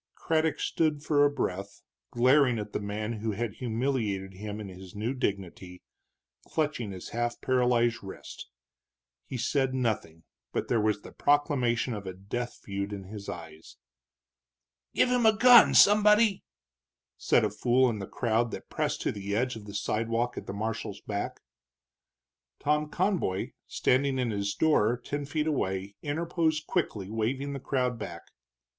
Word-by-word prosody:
Craddock 160 -1 0
stood 155 -3 0
for 145 -2 +3
a 145 - +5
breath 100 -7 -4 0.3
glaring 125 0 +4
at 105 -1 -5
the - - -1
man 105 +2 -3
who 110 -1 -1
had 110 0 -3
humiliated 110 -6 -2
him 105 +2 -6
in 105 - -6
his 95 0 -11
new 110 +5 -2
dignity, 95 -6 -4 0.6
clutching 145 -9 -1
his 95 -1 -8
half 120 0 -2
paralyzed 125 -2 +2
wrist. 95 - -9 0.8
He 130 - -4
said 130 +2 0
nothing, 105 -10 -2 0.3
but - - -2
there 115 -3 +2
was 105 -1 0
the - - -10
proclamation 130 -5 +1
of 100 -2 -6
a 95 - -5
death 120 +6 -5
feud 100 0 -4
in 100 -1 -6
his 100 +1 -8
eyes. 80 -2 -9 1.2
"Give - - +4
him 250 -1 +2
a 215 -1 +4
gun, 245 +1 +8
somebody!" 210 0 +6 0.7
said - - +3
a 105 - -1
fool 125 +5 +3
in 110 -3 -2
the 100 - -5
crowd 115 -1 0
that - - -8
pressed - - -1
to - - 0
the 100 0 -4
edge 125 +2 0
of 110 -2 -9
the 100 0 -9
sidewalk 115 +4 -1
at - - -7
the - - -3
marshal's 110 -1 -4
back. 100 -1 -4 1.2
Tom 150 +1 +1
Conboy, 175 - 0 0.2
standing 135 +1 +1
in 125 -3 0
his 100 -1 -2
door 125 -7 +3
ten 145 +4 -4
feet 150 +2 -1
away, 100 -10 -1
interposed 160 0 -1
quickly, 110 - -1
waving 130 +6 -1
the 140 - -4
crowd 125 -3 -1
back. 85 -5 -7
120 Hz, 155 wpm, -29 LUFS, 100-140 Hz, 1.2 s, gun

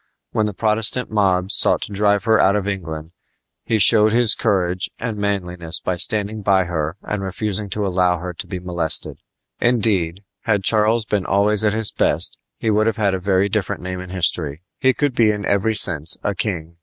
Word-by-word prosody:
When 110 -1 0
the 105 - -4
Protestant 110 +4 0
mobs 95 -3 +1
sought - - +4
to - - -6
drive 100 0 +1
her 110 -1 +3
out 100 +1 +3
of 100 -1 -2
England 80 -5 -5 0.5
he 110 - 0
showed 105 +1 +5
his 120 -2 +3
courage 95 -4 -1
and 115 -2 -4
manliness 90 -5 -1
by 90 - -3
standing 105 +3 0
by 95 -1 +2
her 85 -1 -3
and 105 -2 -4
refusing 100 +1 -3
to 105 +1 -2
allow 90 -1 +1
her 90 +1 -6
to 90 - -9
be 95 0 -5
molested. 90 -3 0 0.4
Indeed, 105 -7 0 0.2
had 105 -3 +1
Charles 110 +2 +2
been 105 -3 -2
always 100 +2 +2
at 105 -1 +2
his 110 -2 +1
best - - -1 0.2
he 110 - -1
would 110 +1 +2
have 115 - -1
had 100 -3 +1
a 95 - -2
very 95 +1 +1
different 100 -3 -3
name 90 0 -5
in 90 0 -9
history. 85 -3 0 0.2
He 130 0 +2
could 145 -3 0
be 115 -3 +3
in 105 -2 -2
every 100 +2 0
sense 80 -5 +3
a 100 - -1
king. 85 -4 -4
100 Hz, 195 wpm, -20 LUFS, 90-105 Hz, 0.5 s, showed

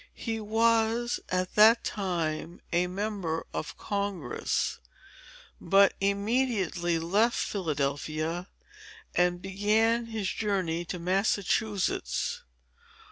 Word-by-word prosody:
He 225 -2 -3
was, 225 +2 +2
at 185 0 -1
that 220 +2 +6
time, 170 -4 -2
a 175 +1 +2
member 185 -4 -3
of 155 - -5
Congress, 200 - -2 0.8
but 195 +3 +5
immediately 200 -4 +1
left 200 +9 +2
Philadelphia, 155 0 -2 0.7
and 175 0 +1
began 215 +4 +2
his 220 -4 -2
journey 185 -5 -1
to 180 - -4
Massachusetts. 200 - 0
195 Hz, 85 wpm, -28 LUFS, 175-220 Hz, 0.8 s, that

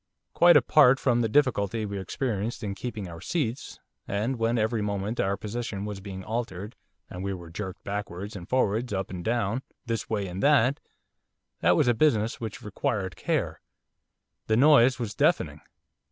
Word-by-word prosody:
Quite 175 0 +7
apart 135 -3 +5
from 120 -2 +2
the 115 - +1
difficulty 110 -5 +1
we 100 -1 -4
experienced 110 +3 -3
in 100 -2 -2
keeping 105 -1 -5
our 85 -1 -9
seats 135 -7 -3 0.3
and 110 +6 -1
when 115 +1 +1
every 110 0 0
moment 105 +2 -2
our 100 +1 +1
position 105 -2 -4
was 105 -2 -5
being 95 -1 -7
altered 105 -1 -4 0.3
and 90 +1 -7
we 100 0 -2
were 85 -2 -10
jerked 95 +1 -6
backwards 100 0 -5
and 90 -2 -9
forwards 120 -2 +1
up 95 -2 -2
and 90 -2 -5
down, 115 +2 0 0.2
this 115 -2 -3
way 105 -3 -1
and 90 +1 -5
that, 140 -1 +4 0.8
that - - +4
was - - +3
a 120 - +5
business 115 -4 +1
which 110 -3 -6
required 100 -2 -2
care, - - -2 0.9
the 110 - +2
noise 135 -2 +6
was 115 -4 -4
deafening. - - +1
110 Hz, 170 wpm, -27 LUFS, 100-120 Hz, 0.9 s, Quite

